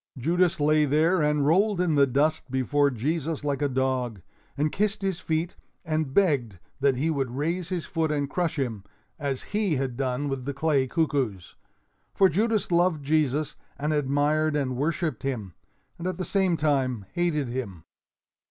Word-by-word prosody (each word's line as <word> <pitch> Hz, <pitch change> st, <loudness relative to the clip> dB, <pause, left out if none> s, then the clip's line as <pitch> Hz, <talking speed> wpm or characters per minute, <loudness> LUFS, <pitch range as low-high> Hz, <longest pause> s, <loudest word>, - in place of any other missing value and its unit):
Judas 170 Hz, +6 st, +1 dB
lay 150 Hz, +1 st, +4 dB
there 160 Hz, +5 st, +3 dB
and 150 Hz, -1 st, +2 dB
rolled 195 Hz, +5 st, +3 dB
in 180 Hz, -3 st, +2 dB
the 140 Hz, -1 st, +5 dB
dust 145 Hz, +3 st, +1 dB
before 140 Hz, +3 st, +2 dB
Jesus 150 Hz, +5 st, -2 dB
like 145 Hz, -1 st, -1 dB
a 145 Hz, -, +2 dB
dog, 130 Hz, -4 st, -1 dB, 0.4 s
and 150 Hz, +1 st, +1 dB
kissed 210 Hz, 0 st, -1 dB
his 190 Hz, -3 st, -1 dB
feet 165 Hz, 0 st, -2 dB, 0.3 s
and 155 Hz, -3 st, -1 dB
begged 135 Hz, -, +2 dB, 0.2 s
that 140 Hz, -1 st, +3 dB
he 155 Hz, +6 st, 0 dB
would 135 Hz, -4 st, -1 dB
raise 160 Hz, +7 st, -2 dB
his 180 Hz, -3 st, -2 dB
foot 160 Hz, -3 st, -1 dB
and 145 Hz, -2 st, 0 dB
crush 165 Hz, +1 st, -1 dB
him, 115 Hz, -8 st, -2 dB, 0.4 s
as 140 Hz, -3 st, -2 dB
he 205 Hz, -6 st, +1 dB
had 130 Hz, -2 st, -2 dB
done 130 Hz, +1 st, -1 dB
with 135 Hz, -2 st, -3 dB
the 140 Hz, 0 st, -3 dB
clay 140 Hz, -2 st, +1 dB
cuckoos. 130 Hz, -, -1 dB, 0.6 s
For 190 Hz, -1 st, +5 dB
Judas 215 Hz, +4 st, 0 dB
loved 170 Hz, -4 st, +2 dB
Jesus 150 Hz, 0 st, +1 dB, 0.2 s
and 150 Hz, +2 st, -1 dB
admired 150 Hz, +2 st, +1 dB
and 135 Hz, -3 st, -1 dB
worshiped 155 Hz, 0 st, -1 dB
him, 110 Hz, -10 st, -4 dB, 0.5 s
and 175 Hz, -, -3 dB
at 185 Hz, -2 st, -3 dB
the 185 Hz, -, -3 dB
same 190 Hz, -4 st, +1 dB
time 130 Hz, -8 st, 0 dB
hated 155 Hz, -7 st, 0 dB
him. 110 Hz, -10 st, -5 dB
150 Hz, 170 wpm, -26 LUFS, 135-165 Hz, 0.6 s, the